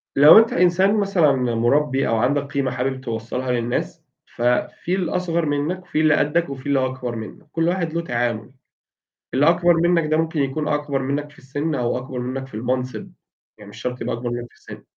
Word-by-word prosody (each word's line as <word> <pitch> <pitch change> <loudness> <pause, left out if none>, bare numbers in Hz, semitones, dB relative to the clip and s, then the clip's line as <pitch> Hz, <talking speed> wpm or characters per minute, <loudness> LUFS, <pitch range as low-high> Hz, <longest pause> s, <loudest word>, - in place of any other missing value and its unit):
لو 150 +6 +9
أنت 225 +1 +5
إنسان 180 +3 +3
مثلًا 195 -7 +3
م 130 -2 0 0.2
مُربي 140 +2 +2
أو 115 - +1
عندك 135 +6 +2
قيمة 140 -2 -2
حابب 130 +1 -2
توصّلها 120 +1 -3
للناس، 120 -1 -2 0.3
ففي 125 +8 0
الأصغر 175 -2 -1
منك، 150 +5 -2
في 175 - -2
اللي 155 -1 +4
قدّك 155 +2 +1
وفي 130 -1 -8
اللي 135 -2 +2
أكبر 125 -2 -4
منك، 110 +5 -9
كل 165 0 0
واحد 175 -2 -1
له 170 - 0
تعامل. 120 -5 -2 0.8
اللي 145 +4 +4
أكبر 175 +1 +4
منك 170 -1 +2
ده 155 - +3
ممكن 160 -1 0
يكون 145 +3 -2
أكبر 145 -2 -1
منك 145 +2 -2
في 150 - -21
السِن 145 +4 -3
أو 125 -2 -1
أكبر 125 0 -7
منك 130 +2 -4
في 135 - -16
المنصب، 125 +3 -3 0.5
يعني 105 -1 -12
مش - - -12
شرط 125 0 -4
يبقى - - -2
أكبر 120 0 -4
منك 120 0 -4
في - - -25
السِن. - - -12
140 Hz, 195 wpm, -22 LUFS, 125-165 Hz, 0.8 s, لو